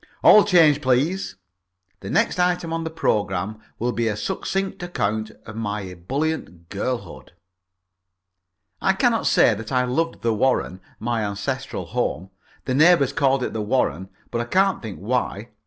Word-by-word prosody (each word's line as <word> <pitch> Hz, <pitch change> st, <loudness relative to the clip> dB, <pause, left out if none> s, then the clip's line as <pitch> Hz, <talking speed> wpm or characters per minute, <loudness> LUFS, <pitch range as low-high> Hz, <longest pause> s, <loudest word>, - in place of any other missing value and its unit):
All 210 Hz, -, +8 dB
change, 160 Hz, -7 st, +5 dB
please. 145 Hz, +9 st, 0 dB, 0.6 s
The -, -, -8 dB
next -, -, +1 dB
item 180 Hz, -2 st, +1 dB
on 165 Hz, 0 st, -2 dB
the 160 Hz, -, -3 dB
programme 105 Hz, -, -1 dB, 0.2 s
will 120 Hz, +2 st, -1 dB
be 115 Hz, -1 st, -1 dB
a 105 Hz, -2 st, -1 dB
succinct 195 Hz, -, -3 dB
account 110 Hz, -11 st, -2 dB, 0.2 s
of 110 Hz, -, -9 dB
my 105 Hz, -2 st, -3 dB
ebullient 90 Hz, -, -4 dB
girlhood. 100 Hz, -2 st, -5 dB, 1.5 s
I 190 Hz, -, +3 dB
cannot 225 Hz, +3 st, +1 dB
say 115 Hz, -, +5 dB
that 110 Hz, +4 st, -7 dB
I 125 Hz, -1 st, +2 dB
loved 165 Hz, +7 st, -2 dB
the 115 Hz, -1 st, +2 dB
Warren, 110 Hz, -5 st, 0 dB, 0.2 s
my 115 Hz, -1 st, -1 dB
ancestral 100 Hz, 0 st, -4 dB
home. 95 Hz, +4 st, -3 dB, 0.3 s
The 130 Hz, -, -1 dB
neighbours 150 Hz, -1 st, +5 dB
called 135 Hz, -2 st, +2 dB
it -, -, -3 dB
the 110 Hz, -, -2 dB
Warren, 95 Hz, -, 0 dB, 0.2 s
but 120 Hz, -, -1 dB
I -, -, -3 dB
can't 190 Hz, +9 st, +2 dB
think 110 Hz, -5 st, -7 dB
why. 115 Hz, 0 st, -2 dB
125 Hz, 155 wpm, -23 LUFS, 105-160 Hz, 1.5 s, All